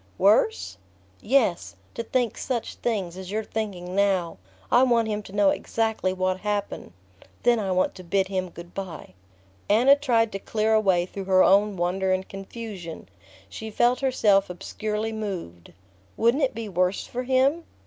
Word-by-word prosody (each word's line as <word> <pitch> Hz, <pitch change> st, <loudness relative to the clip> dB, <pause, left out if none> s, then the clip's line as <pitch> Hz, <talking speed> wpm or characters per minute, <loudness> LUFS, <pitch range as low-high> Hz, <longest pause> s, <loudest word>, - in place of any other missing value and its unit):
"Worse?" 220 Hz, -, +2 dB, 0.4 s
"Yes 220 Hz, -, +1 dB, 0.2 s
to -, -, -4 dB
think 240 Hz, 0 st, -1 dB
such 245 Hz, -4 st, -3 dB
things 195 Hz, -7 st, -3 dB
as 190 Hz, -1 st, -8 dB
you're 215 Hz, +2 st, -2 dB
thinking 195 Hz, -5 st, -5 dB
now...I 195 Hz, +4 st, 0 dB
want 235 Hz, -3 st, +3 dB
him 210 Hz, -1 st, -2 dB
to 195 Hz, -, -13 dB
know 200 Hz, -1 st, +3 dB
exactly 220 Hz, -4 st, -1 dB
what 185 Hz, 0 st, -1 dB
happened... 205 Hz, -, -3 dB, 0.5 s
then 240 Hz, -1 st, +4 dB
I 195 Hz, -3 st, -2 dB
want 185 Hz, 0 st, +1 dB
to 185 Hz, -, -11 dB
bid 190 Hz, +2 st, +1 dB
him 185 Hz, -1 st, -2 dB
good 170 Hz, +1 st, -12 dB
bye." 180 Hz, -, -7 dB, 0.6 s
Anna 245 Hz, +7 st, +6 dB
tried 235 Hz, -6 st, +1 dB
to 195 Hz, -, -4 dB
clear 215 Hz, +2 st, 0 dB
a 220 Hz, -, +5 dB
way 180 Hz, -4 st, +2 dB
through 195 Hz, +1 st, -7 dB
her 185 Hz, -1 st, +5 dB
own 200 Hz, +1 st, +4 dB
wonder 185 Hz, +2 st, 0 dB
and 185 Hz, 0 st, -1 dB
confusion. 195 Hz, -4 st, -8 dB, 0.4 s
She 220 Hz, -, -7 dB
felt 240 Hz, +3 st, +2 dB
herself 210 Hz, -8 st, +3 dB
obscurely 215 Hz, +4 st, -4 dB
moved. 185 Hz, -, -6 dB, 0.5 s
"Wouldn't 235 Hz, +6 st, +3 dB
it 265 Hz, -5 st, +1 dB
be 230 Hz, -1 st, -5 dB
worse 185 Hz, 0 st, 0 dB
for 250 Hz, -, -4 dB
him?" 265 Hz, +6 st, +2 dB
205 Hz, 160 wpm, -25 LUFS, 185-230 Hz, 0.6 s, Anna